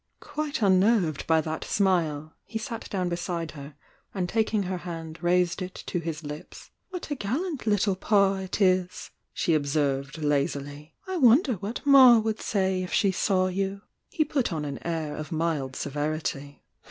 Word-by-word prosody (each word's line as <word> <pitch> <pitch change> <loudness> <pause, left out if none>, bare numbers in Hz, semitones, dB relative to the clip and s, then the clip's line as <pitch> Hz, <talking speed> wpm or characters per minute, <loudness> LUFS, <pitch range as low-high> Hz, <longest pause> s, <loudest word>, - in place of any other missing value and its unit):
Quite 300 -4 -3
unnerved 190 -4 +3
by 160 -1 +4
that 155 +1 -4
smile, 160 -6 0
he 225 - -5
sat 230 0 -6
down 185 -3 -1
beside 170 -2 -3
her 140 -1 -10 0.4
and 185 -2 -1
taking 215 +1 +1
her 185 -1 -3
hand 165 -2 -7
raised 175 +1 +2
it 185 0 -5
to 175 - -2
his 165 -1 -5
lips. 150 +1 -9 0.2
"What 360 -5 -7
a - - 0
gallant 275 - -3
little 205 -2 +2
Pa 195 0 +3
it 190 +1 -4
is!" 185 -2 +1 0.2
she 170 - 0
observed, 140 -1 0
laz 145 -2 +1
Uy. 145 +2 -9
"I 375 -1 -2
wonder 260 0 +5
what 205 - -5
'Ma' 265 -4 +8
would 220 0 -1
say 190 -2 0
if 180 - -5
she 200 - +3
saw 185 0 +1
you! 195 +2 -2 0.3
He 310 -4 0
put 275 -7 -1
on 155 -2 -2
an 140 -2 -5
air 160 -3 -3
of 155 +3 -7
mild 155 -5 -1
seventy. 145 -1 -3
180 Hz, 170 wpm, -27 LUFS, 155-210 Hz, 0.4 s, Ma